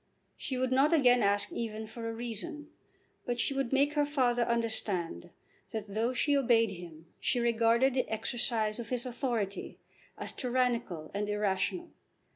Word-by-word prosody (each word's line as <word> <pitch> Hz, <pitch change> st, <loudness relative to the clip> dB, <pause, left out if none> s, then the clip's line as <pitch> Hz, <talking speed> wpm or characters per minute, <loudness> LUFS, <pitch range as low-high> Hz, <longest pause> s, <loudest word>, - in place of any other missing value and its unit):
She 260 Hz, -, -4 dB
would 255 Hz, 0 st, 0 dB
not 275 Hz, +5 st, +4 dB
again 250 Hz, -6 st, +5 dB
ask 200 Hz, 0 st, +2 dB
even 220 Hz, -1 st, -4 dB
for 230 Hz, +1 st, -6 dB
a -, -, -2 dB
reason. 240 Hz, +7 st, -6 dB, 0.6 s
But 240 Hz, -1 st, -1 dB
she 275 Hz, -, +1 dB
would 270 Hz, -3 st, -1 dB
make 280 Hz, +2 st, +3 dB
her 295 Hz, -1 st, +3 dB
father 255 Hz, -4 st, +1 dB
understand 220 Hz, -, -1 dB, 0.4 s
that 210 Hz, -2 st, -5 dB
though 225 Hz, +3 st, +1 dB
she 285 Hz, +3 st, +2 dB
obeyed 230 Hz, -5 st, +3 dB
him 170 Hz, -3 st, -10 dB
she 245 Hz, -, +1 dB
regarded 235 Hz, +2 st, +3 dB
the 255 Hz, -, 0 dB
exercise 220 Hz, -1 st, -1 dB
of 230 Hz, -1 st, -6 dB
his 250 Hz, -1 st, -1 dB
authority 235 Hz, -6 st, -2 dB, 0.4 s
as -, -, -4 dB
tyrannical 240 Hz, -, -1 dB
and 205 Hz, +1 st, -2 dB
irrational. 210 Hz, -, -1 dB
235 Hz, 155 wpm, -31 LUFS, 215-255 Hz, 0.6 s, again